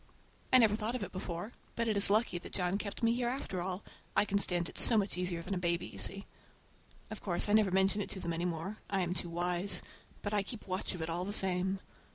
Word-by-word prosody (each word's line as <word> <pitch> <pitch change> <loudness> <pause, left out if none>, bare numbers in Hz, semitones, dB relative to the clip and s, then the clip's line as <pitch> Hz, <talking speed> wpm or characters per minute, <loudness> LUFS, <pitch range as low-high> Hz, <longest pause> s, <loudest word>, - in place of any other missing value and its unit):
I 255 - +9
never 220 -4 +5
thought 220 +2 -2
of 245 - -2
it - - -6
before, 185 +4 -5 0.2
but 230 0 0
it 220 - +1
is 200 0 +4
lucky 210 -3 +2
that - - -9
John 180 +1 0
kept 205 +3 -5
me 230 0 +4
here 240 0 0
after 240 -8 -3
all. 185 +2 -3 0.3
I - - +5
can 200 0 +1
stand 175 -3 +2
it - - -8
so 230 - +6
much 200 -1 +1
easier 180 -2 -2
than 200 - -3
a 185 - -1
baby, 170 -1 0
you - - -9
see. 195 +1 -1 0.9
Of 215 - -6
course 175 -1 +1
I 205 - +2
never 215 -2 +5
mention 190 +2 +3
it - - -4
to 190 - -6
them 170 -2 -3
any 170 +2 -1
more,—I 190 +3 -3
am 175 0 0
too 175 0 -3
wise,—but 180 +4 -1
I 205 - +3
keep 210 +3 -8
watch 185 0 -2
of 165 - -4
it 160 - -3
all 175 +2 -1
the 200 - -3
same. 190 -1 0
195 Hz, 245 wpm, -33 LUFS, 180-210 Hz, 0.9 s, I